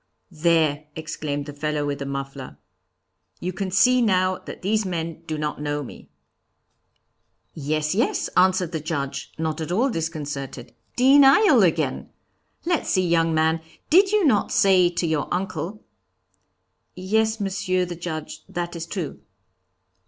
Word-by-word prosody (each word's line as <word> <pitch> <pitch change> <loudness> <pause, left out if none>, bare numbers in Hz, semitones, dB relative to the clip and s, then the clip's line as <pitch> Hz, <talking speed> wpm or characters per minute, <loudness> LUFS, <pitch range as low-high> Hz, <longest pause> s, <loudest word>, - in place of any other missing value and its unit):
'There,' 155 -2 +1
exclaimed 150 -2 -4
the 145 - -8
fellow 150 0 -2
with 145 -1 -3
the 140 - -4
muffler. 135 -1 -6 0.8
'You 180 +1 -3
can 195 +1 -3
see 250 +7 +4
now 185 -4 +2
that - - -10
these 215 +3 +1
men 165 -3 -4
do 155 - -3
not 150 -1 -3
know 145 0 -2
me.' - - -12 1.4
'Yes, 155 +1 -1
yes,' 220 +5 0
answered 185 -2 +2
the 160 - -2
Judge, 140 -3 -4
not 160 0 -2
at 160 - -4
all 245 +9 +2
disconcerted. 145 - -5 0.2
'Denial 275 - +6
again! - - 0 0.6
Let's 345 -3 0
see, 185 -2 +2
young 165 -1 +2
man, 160 +1 +2 0.3
did 385 +4 +6
you 425 -4 +3
not 215 -8 +2
say 185 -3 +4
to 175 0 -2
your 160 -3 -1
uncle 185 +2 -3 0.6
' - - -49
'Yes, 220 +4 0
Monsieur 185 -2 -1
the 175 0 -6
Judge, 160 -2 -6
that 175 0 -4
is 165 0 -5
true.' 170 -4 -5
170 Hz, 145 wpm, -23 LUFS, 150-190 Hz, 1.4 s, Denial